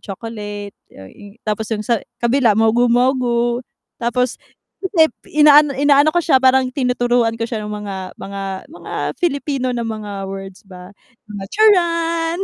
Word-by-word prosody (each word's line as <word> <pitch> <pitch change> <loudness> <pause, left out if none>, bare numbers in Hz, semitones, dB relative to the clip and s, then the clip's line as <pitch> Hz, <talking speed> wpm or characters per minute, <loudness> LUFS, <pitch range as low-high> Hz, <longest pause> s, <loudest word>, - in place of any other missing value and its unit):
chocolate 205 -1 -7
y - - -26
yun 95 0 -12 0.4
tapos 215 0 -2
yung 210 - -4
sa 235 -1 +1 0.2
kabila 235 -2 +3
mogu 225 +2 +3
mogu. 240 -1 +1 0.4
Tapos 245 +1 -1 0.4
hindi 345 -5 +2 0.2
inaano 295 -2 +6
inaano 285 +1 +4
ko 345 - +1
siya 265 -6 +4
parang 260 0 +4
tinuturuan 245 -3 +1
ko 230 - -2
siya 230 -2 -4
ng 210 - -5
mga 195 -1 -5 0.2
mga 195 0 -7 0.3
mga 330 - -11 0.3
Filipino 275 -6 -1
na 235 - -2
mga 210 -3 -5
words 195 0 -8
ba, 180 -2 -12 0.4
mga 205 -2 -7
"Charan!" 335 -5 +2
240 Hz, 145 wpm, -18 LUFS, 210-285 Hz, 0.4 s, inaano